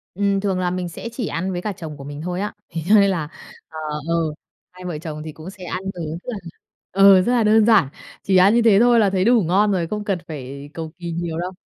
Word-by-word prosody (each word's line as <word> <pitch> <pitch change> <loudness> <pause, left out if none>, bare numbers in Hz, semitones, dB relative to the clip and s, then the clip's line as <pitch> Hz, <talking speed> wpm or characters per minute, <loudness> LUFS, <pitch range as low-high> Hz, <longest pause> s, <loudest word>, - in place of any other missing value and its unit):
Ừm, 200 0 +1
thường 195 -2 -1
là 180 -1 0
mình 180 -1 -3
sẽ 230 - -7
chỉ 235 -3 -4
ăn 185 +3 -2
với 175 -1 -3
cả 210 +2 -3
chồng 160 -4 -8
của 140 - -10
mình 145 +1 -7
thôi 180 +2 -3
á. 210 - -3 0.2
Thế 165 -1 -4
cho 220 - +7
nên 200 -1 +6
là 160 -5 -3 0.4
ờ, 160 - -11 0.3
ờ, 165 - +2 0.6
hai 180 0 -12
vợ 175 -4 -4
chồng 155 -1 -6
thì 155 - -6
cũng 155 +4 -10
sẽ 190 -1 -12
ăn 180 +1 -4
ứ 165 -2 -5
mà - - -4 0.6
ờ, 195 -1 +6
rất 240 - 0
là 240 -3 +3
đơn 215 0 +5
giản, 215 - +5 0.3
chỉ 190 - +2
ăn 190 +4 +6
như 235 - +4
thế 215 -4 +5
thôi 240 0 +5
là 205 -3 +3
thấy 190 -1 +1
đủ 235 +1 +5
ngon 195 +5 +2
rồi, 175 -3 0
không 210 +4 -4
cần 195 -3 -1
phải 140 -1 -8
cầu 160 -1 -6
kỳ 175 -1 -5
nhiều 165 -1 -3
đâu. 180 +2 -3
185 Hz, 260 wpm, -21 LUFS, 165-205 Hz, 0.6 s, cho